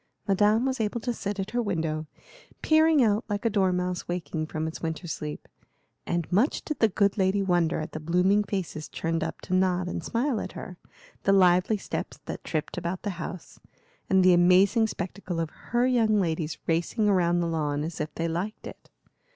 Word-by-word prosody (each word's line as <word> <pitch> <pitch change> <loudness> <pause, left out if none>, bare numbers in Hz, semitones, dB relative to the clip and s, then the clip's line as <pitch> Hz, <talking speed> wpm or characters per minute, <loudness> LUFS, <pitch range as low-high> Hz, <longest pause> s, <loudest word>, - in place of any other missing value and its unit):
Madame 210 +4 +3
was 265 -1 -1
able 220 +2 -1
to 240 +2 -2
sit 205 -2 -4
at 195 +2 -3
her 240 - 0
window, 160 -7 -2 0.6
peering 315 -2 +5
out 215 0 +2
like 205 +2 -2
a 230 - +3
dormouse 180 -3 0
waking 170 -3 -3
from 155 0 -3
its 160 - -5
winter 165 +2 -4
sleep; 150 -2 -5 0.6
and 170 -2 -2
much 215 - +2
did 305 - -4
the 225 - +4
good 200 +1 +1
lady 190 +1 +2
wonder 175 -3 +1
at 155 - -5
the 155 - -5
blooming 180 +6 +2
faces 185 -6 -4
turned 165 0 -2
up - - -5
to - - -5
nod 185 -1 +2
and 175 - -4
smile 235 - 0
at 185 - -6
her, 180 - -8 0.5
the 195 - +2
lively 185 +2 +4
steps - - -5
that - - -6
tripped 155 +2 -3
about 175 +2 -4
the 205 - -1
house, 170 +1 -7 0.5
and 190 -1 +4
the 185 0 +6
amazing 185 +6 +5
spectacle 185 -3 -5
of 165 -2 -2
her 240 +1 -1
young 225 -4 +3
ladies 160 -3 -1
racing 170 +7 0
round 175 -2 +2
the 170 - 0
lawn 150 -3 -1
as 160 0 -4
if 150 0 -3
they 165 - -1
liked 175 +6 -4
it. - - -11
185 Hz, 190 wpm, -27 LUFS, 165-210 Hz, 0.6 s, the